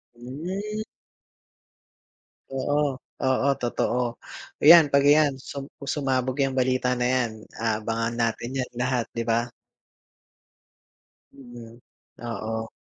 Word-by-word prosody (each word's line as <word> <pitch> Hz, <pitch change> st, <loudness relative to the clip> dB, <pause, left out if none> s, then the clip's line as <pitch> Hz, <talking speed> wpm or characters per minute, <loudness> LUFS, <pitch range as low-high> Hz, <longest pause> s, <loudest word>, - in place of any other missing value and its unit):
Hmm. 180 Hz, -, -5 dB, 1.7 s
Oo, 140 Hz, +1 st, 0 dB, 0.2 s
oo, 130 Hz, +1 st, +2 dB
totoo. 120 Hz, 0 st, 0 dB, 0.6 s
Iyan, 160 Hz, 0 st, +9 dB
‘pag 140 Hz, 0 st, +5 dB
iyan 145 Hz, -1 st, +5 dB
sum 135 Hz, +1 st, -7 dB, 0.3 s
sumabog 130 Hz, -1 st, 0 dB
‘yang 135 Hz, -1 st, 0 dB
balita 125 Hz, 0 st, +1 dB
na 125 Hz, -, 0 dB
‘yan, 125 Hz, -2 st, +1 dB, 0.3 s
aabangan 115 Hz, +1 st, -1 dB
natin 120 Hz, +2 st, -1 dB
‘yan 130 Hz, -1 st, -3 dB
lahat, 125 Hz, -2 st, 0 dB
‘di 115 Hz, -, -2 dB
ba. 115 Hz, +1 st, +1 dB, 1.8 s
Mhm, 120 Hz, -3 st, -12 dB, 0.5 s
oo. 110 Hz, 0 st, -4 dB
130 Hz, 100 wpm, -25 LUFS, 120-140 Hz, 1.8 s, Iyan